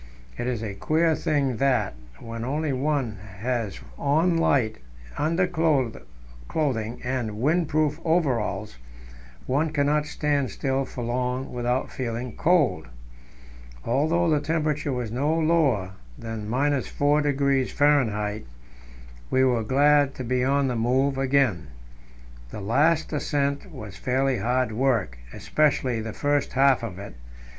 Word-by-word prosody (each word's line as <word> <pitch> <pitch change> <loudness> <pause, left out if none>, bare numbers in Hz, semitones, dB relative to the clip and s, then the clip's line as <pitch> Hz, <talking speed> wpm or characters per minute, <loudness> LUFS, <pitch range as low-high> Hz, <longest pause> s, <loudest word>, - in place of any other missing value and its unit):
It 120 - -4
is 120 -3 -2
a 105 -3 -4
queer 160 +10 +1
thing 140 -6 0
that, 130 - +1 0.3
when 115 0 -7
one - - -3
only 140 -3 -1
has 105 0 -4 0.2
on 160 +5 +2
light 135 - +1 0.4
underclothing 160 -6 0 1.0
and 125 -3 -2
windproof 155 +2 +1
overalls, 120 - 0 0.7
one 145 +5 +1
cannot 150 0 +1
stand 145 -4 0
still 135 0 -1
for 125 - -6
long 125 +2 -2
without 125 +1 -1
feeling 120 -1 -4
cold. 140 - +2 1.0
Although 165 +5 +1
the 155 -2 +3
temperature 150 -1 -1
was 125 -4 -3
no 145 +6 0
lower 155 - +2 0.3
than 110 -2 -6
4° 140 +1 +1 0.8
F., - - -17 0.8
we 130 - +3
were 125 -3 +2
glad 145 +3 +3
to 130 - -5
be 125 +1 0
on 140 +1 +2
the 125 - -1
move 130 +4 +1
again. 135 - +1 0.8
The - - -7
last 150 +11 +2
ascent 145 +3 -1
was 110 -9 -9
fairly 130 +1 0
hard 125 +3 0
work, 110 - 0
especially 130 -6 0
the 110 0 -5
first 145 +4 0
half 135 -1 +4
of 110 -6 -6
it. 100 -7 -8
135 Hz, 120 wpm, -25 LUFS, 120-150 Hz, 1.0 s, half